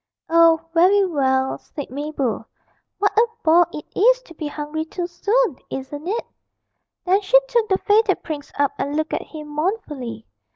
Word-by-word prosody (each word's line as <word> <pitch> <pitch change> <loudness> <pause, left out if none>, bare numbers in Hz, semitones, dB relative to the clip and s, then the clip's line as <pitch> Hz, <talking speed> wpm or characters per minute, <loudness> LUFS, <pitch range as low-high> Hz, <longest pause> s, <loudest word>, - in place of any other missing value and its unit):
'Oh, 330 -1 +6
very 380 +4 +5
well,' 265 -6 0
said 290 -4 -8
Mabel; 275 -5 -2 0.5
'what 405 0 +1
a 450 +3 +5 0.2
bore 335 +2 +5
it 300 - -7
is - - +5
to 335 - -14
be 310 -1 -5
hungry 300 +1 -4
too 345 +2 -4
soon, 410 - 0
isn't 290 +4 -6
it?' 445 +5 -2 0.8
Then 380 +3 +3
she 450 +6 +5
took 470 -3 +1
the 380 - +3
faded 415 -1 +2
prince 295 -3 -6
up 285 -1 +2
and 285 +1 -2
looked 310 +1 -1
at - - -1
him 305 -2 -10
mournfully. 295 - -3
325 Hz, 165 wpm, -21 LUFS, 290-400 Hz, 0.8 s, Oh